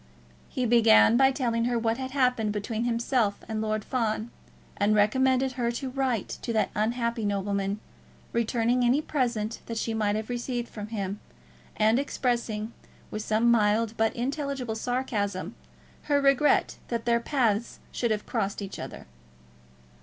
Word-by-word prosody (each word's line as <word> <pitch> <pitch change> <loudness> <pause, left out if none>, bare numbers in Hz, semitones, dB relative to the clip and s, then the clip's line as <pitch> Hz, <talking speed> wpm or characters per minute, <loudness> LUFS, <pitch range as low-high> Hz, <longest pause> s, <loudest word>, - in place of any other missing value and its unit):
He 255 - -1
began 230 -1 +6
by 265 +2 +6
telling 235 -4 0
her 245 0 +1
what 230 +1 0
had 260 0 -3
happened 250 -5 +1
between 215 +2 -2
himself 235 -3 +1
and 220 -1 -2
Lord 215 -1 -1
Fawn, 230 -2 -1 0.4
and 205 +1 +2
recommended 260 +5 +3
her 245 -2 -1
to 260 +2 -4
write 255 -5 -1
to 235 - -3
that 220 - +1
unhappy 235 +1 -1
nobleman, 200 0 -1 0.5
returning 235 +1 +1
any 245 +4 +4
present 235 -7 -1
that 230 - -4
she 225 0 -1
might 210 -2 +1
have 215 0 -3
received 240 0 -3
from 210 -1 -7
him, 205 -2 -4 0.6
and 220 +3 +3
expressing, 235 -5 -2 0.4
with 215 - -3
some 220 +2 +2
mild 220 0 +2
but 225 0 +1
intelligible 270 -1 -2
sarcasm, 220 -6 -2 0.5
her 290 -1 +3
regret 280 +1 +3
that 235 -1 -3
their 235 0 +3
paths 235 -4 0
should 235 - -1
have 215 -1 -1
crossed 200 -4 -2
each 200 -1 -6
other. - - -8
230 Hz, 150 wpm, -27 LUFS, 215-250 Hz, 0.6 s, began